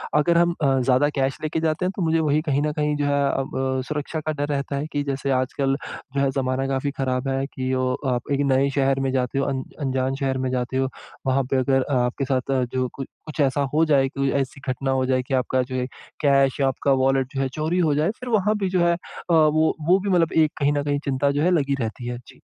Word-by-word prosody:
अगर 170 +3 +3
हम 170 0 +4
अ, 135 -1 +3
ज़्यादा 130 +3 +3
कैश 135 -1 0
लेके 155 +1 -1
जाते 160 +2 0
हैं। 185 - 0
तो - - -3
मुझे 165 -1 +2
वही 155 -1 +2
कहीं 145 -3 0
न 150 0 0
कहीं 150 0 0
जो 145 - 0
है 140 0 +2
अब 135 0 -2 0.4
सुरक्षा 150 +1 -3
का 155 - -2
डर 145 -1 -2
रहता 140 -1 -2
है 140 +2 -2
कि 145 - 0
जैसे 140 0 -2
आजकल 135 +1 0 0.4
जो - - +1
है 140 - +2
ज़माना 135 0 -1
काफ़ी 135 +1 -1
ख़राब 130 0 -1
है 135 0 0
कि 130 -1 -2
अ, 130 - +1 0.3
आप 120 +3 -4
एक 140 - +1
नए 135 +1 +3
शहर 135 -1 +2
में 135 -1 0
जाते 130 +1 0
हो, 135 - +1
अन 135 -2 -2 0.2
अनजान 130 -1 0
शहर 135 -1 0
में - - 0
जाते 125 0 -2
हो। 135 0 +1 0.4
वहाँ 135 +1 +2
पे 135 - +3
अगर 135 0 +2
आपके 125 +3 0
साथ 130 0 -1 0.2
जो 130 -1 0
कु 135 - -5 0.2
कुछ 155 0 -9
ऐसा 140 0 +2
हो 155 +2 +4
जाए 140 -4 +3
कोई 140 0 -1
ऐसी 135 +1 -6
घटना 135 +1 -1
हो 130 -1 +1
जाए 130 0 +1
कि 130 - -5
आपका 130 0 +1
जो 130 +1 -6
है 125 -1 0 0.4
कैश 140 -2 +3
या 135 - +4
आपका 135 +1 0
वॉलेट 135 +1 +1
जो 135 - 0
है 135 - 0
चोरी 160 +4 0
हो 155 -5 +2
जाए। 155 +6 +2
फिर 250 - -6
वहाँ 210 -1 +2
पे 190 - +1
जो 180 -1 +1
है 170 - +4
अ, - - -7 0.4
वो 155 0 +4
वो 185 +2 +6
भी 200 +1 -3
मतलब 170 -3 +3
एक 155 -2 +4
कहीं 145 0 +2
न 145 -1 0
कहीं 145 0 0
चिंता 140 0 +1
जो 145 +1 0
है 180 - +3
लगी 140 -5 +2
रहती 115 +2 -4
है। 120 0 -3
जी। - - -16
140 Hz, 255 wpm, -23 LUFS, 130-150 Hz, 0.4 s, वो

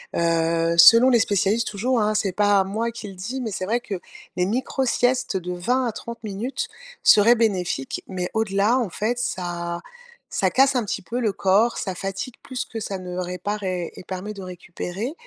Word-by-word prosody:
Heu, 165 0 +1
selon 230 +8 +9
les 235 - +5
spécialistes, 205 +2 +1
toujours 230 +3 0
hein, 210 0 +1
c'est 195 -3 +1
pas 205 -1 +3
moi 225 +4 -2
qui 225 -2 -8
le 195 - -8
dis, 225 +9 -5
mais 225 -4 -3
c'est 185 - -3
vrai 235 +4 +1
que 205 -6 -5 0.4
les 180 0 +1
micro-siestes 250 -1 0
de 180 0 -4
20 245 +9 0
à 235 - 0
30 235 0 -8
minutes 220 +6 -3 0.4
seraient 225 +4 +7
bénéfiques. 185 - -1
Mais 180 -2 -3
au-delà, 220 +2 +2
en 225 -6 -1
fait, 225 +8 -2
ça 175 -5 -3 0.5
ça - - +2
casse 270 0 +4
un 235 - 0
petit - - -3
peu 235 +7 -4
le 215 -5 0
corps. 200 +6 +2
Ça 190 - -3
fatigue 195 +6 -5
plus 255 -1 -4
que 225 - -6
ça 195 -2 -4
ne 180 0 -6
répare 185 +3 -3
et 180 -2 -2
et - - -10
permet 190 +3 -5
de 200 - -9
récupérer 185 - -6
205 Hz, 195 wpm, -23 LUFS, 185-235 Hz, 0.5 s, selon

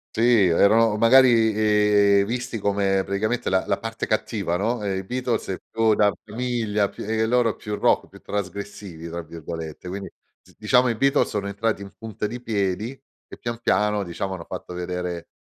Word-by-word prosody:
Sì, 115 -3 +4
erano 105 +5 +4
magari, 115 -1 +5
ehm, 105 -1 +4
visti 125 +2 -3
come 100 -2 +1
praticamente 110 +5 -1
la 95 0 +2
la - - +1
parte 115 0 -5
cattiva, 110 -5 -1
no, 115 +4 -1
ehm, 95 -1 -1
i - - -6
Beatles 125 +3 -2
è 95 - -2
più 115 -1 +2
da 105 -1 +3
famiglia 110 -3 -1
più - - -9
e 110 +1 -2
e 110 - +2
loro 120 -1 +2
più 105 -1 -5
rock, - - +2
più - - -15
"trasgressivi", 100 -4 -6
tra 85 +1 -4
virgolette, 80 +1 -8
quindi, 95 +2 -6 0.3
z - - -23
diciamo, 125 +4 +3
i 115 - 0
Beatles 140 +5 +2
sono 100 -1 -3
entrati 100 0 -2
in 100 - -10
punta 110 -1 -5
di 120 +4 -5
piedi 110 +3 -2 0.3
e - - -11
pian 120 0 -5
piano, 105 -1 +1
diciamo, 95 +2 -4
hanno 85 -3 -7
fatto 90 - -7
vedere, 90 -1 -4
105 Hz, 185 wpm, -23 LUFS, 95-115 Hz, 0.3 s, magari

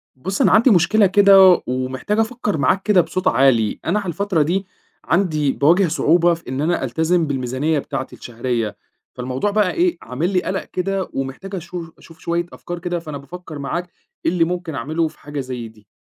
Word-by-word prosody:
بُصّ، 190 +9 -3
أنا - - +4
عندي 225 +5 +5
مشكلة 210 +3 +4
كده، 195 -1 +6
ومحتاج 130 - -2
أفكر 220 -5 -1
معاك 185 +7 +2
كده 205 -4 +4
بصوت 185 +2 -3
عالي، 115 -4 +3
أنا 190 +6 +1
على 200 - -6
الفترة 180 0 0
دي 185 +6 0 0.4
عندي 155 -6 +1
باواجه 170 +8 +3
صعوبة 170 +2 +3
في 165 -4 -8
إن 130 +2 -3
أنا 170 +1 0
ألتزم 160 +6 +1
بالميزانية 135 +3 -1
بتاعتي 130 - -5
الشهرية، 120 -2 -3 0.4
فالموضوع 130 +10 -2
بقى 210 -3 +2
إيه، 350 0 +1
عامل 145 +8 -2
لي 180 - +2
قلَق 190 +1 -3
كده 190 +1 -3
ومحتاج 135 +9 -5
أشو 170 -1 -7
أشوف 165 - -17
شوية 170 +1 -1
أفكار 175 0 -7
كده 175 0 -3
فأنا 155 -3 -7
بافكَّر 155 +2 -9
معاك 175 +6 -3 0.4
إيه - - +3
اللي 170 -2 +2
ممكن 175 -2 -3
أعملُه 155 +7 -1
في - - -13
حاجة 145 0 -6
زي 125 -3 -5
دي؟ 110 -2 -19
165 Hz, 185 wpm, -20 LUFS, 135-185 Hz, 0.4 s, كده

